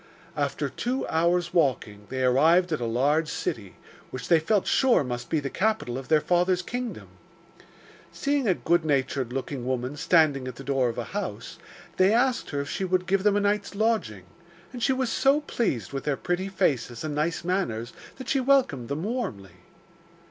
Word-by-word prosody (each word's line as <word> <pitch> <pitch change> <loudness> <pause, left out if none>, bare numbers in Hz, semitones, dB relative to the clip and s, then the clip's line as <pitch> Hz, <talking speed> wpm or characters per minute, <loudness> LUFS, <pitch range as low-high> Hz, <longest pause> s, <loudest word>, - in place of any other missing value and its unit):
After 145 -1 -1
two 250 - -3
hours' 170 +1 +1
walking, 110 -10 0
they 130 0 -2
arrived 160 +8 +4
at 155 - -1
a - - -1
large 145 +7 +1
city, 100 -5 -4 0.3
which 130 -2 -7
they 165 - +6
felt 195 +5 +1
sure 260 - +3
must 120 -1 -5
be 160 - +1
the 140 - -4
capital 215 - 0
of 130 0 -6
their 155 -1 +4
father's 180 +2 +1
kingdom. 245 +3 -5 1.0
Seeing 280 -3 0
a 185 - +3
good 170 0 +1
natured 135 -4 0
looking 135 0 -4
woman 130 +2 -2
standing 150 -4 +2
at 130 - -6
the 135 - -9
door 135 -2 +1
of 115 - -6
a 120 - -2
house, 165 - -5 0.4
they 185 +2 +5
asked 245 +2 +1
her 140 -1 -2
if 140 - -6
she - - -3
would 185 -1 0
give 195 +1 +1
them 205 0 +3
a - - +3
night's 205 0 -1
lodging, 210 - 0 0.5
and 245 - -7
she 265 - +2
was 260 -2 0
so 275 +3 +3
pleased 135 - -2
with 135 - -4
their 145 -2 0
pretty 185 +2 -2
faces 125 -10 -1
and 155 -1 -3
nice 160 +3 -1
manners 125 - -2 0.2
that 260 - -9
she 275 - +1
welcomed 255 - +2
them 145 +4 -3
warmly. 110 - -4
160 Hz, 185 wpm, -26 LUFS, 130-200 Hz, 1.0 s, they